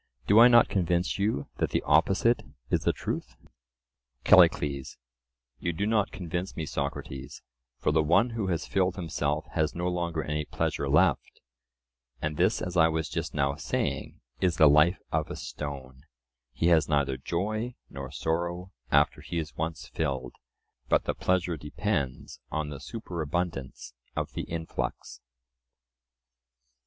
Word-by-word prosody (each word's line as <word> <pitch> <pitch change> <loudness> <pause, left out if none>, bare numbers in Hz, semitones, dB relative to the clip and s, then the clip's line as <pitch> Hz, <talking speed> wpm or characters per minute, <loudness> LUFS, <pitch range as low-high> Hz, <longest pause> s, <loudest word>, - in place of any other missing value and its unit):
Do 105 +2 +6
I 120 - +10
not 120 -1 +7
convince 90 0 0
you 100 -8 0
that - - 0
the - - 0
opposite 115 +5 +3 0.3
is - - +3
the - - +4
truth? - - -5 0.9
CALLICLES: 70 -2 +4 0.6
You 85 - -1
do 100 +6 -1
not 105 -2 +1
convince 90 +1 -4
me, 80 - -3
Socrates, 70 -2 -5 0.3
for - - +1
the 80 +1 +3
one 85 +10 +3
who 115 -4 -2
has 85 -4 -1
filled 95 -2 +1
himself 80 -3 -2
has 80 -2 0
no 90 +1 -1
longer 85 -3 -1
any 75 0 -2
pleasure 70 -1 -2
left; 80 +1 +2 0.8
and 75 +2 -2
this, - - +2
as 90 0 -4
I 80 -2 +6
was 80 -1 -1
just - - -4
now 70 -1 +1
saying, 75 +2 -3 0.2
is 90 -3 +2
the 80 - +7
life 75 +5 +5
of - - 0
a - - -5
stone: 65 -3 -7 0.5
he 80 +6 +1
has 80 -3 +4
neither 70 -3 +2
joy 110 - -2
nor 70 -1 -7
sorrow 85 +5 -2 0.2
after 75 +1 +3
he 85 - -5
is 80 -2 -4
once 80 0 -4
filled; 65 -5 -3 0.6
but - - +3
the - - -1
pleasure 90 -2 0
depends 75 -2 -3
on 80 -1 -2
the 70 -2 -7
superabundance 85 - -4 0.2
of - - -3
the - - -4
influx. 80 -1 -4
80 Hz, 145 wpm, -28 LUFS, 75-90 Hz, 0.9 s, I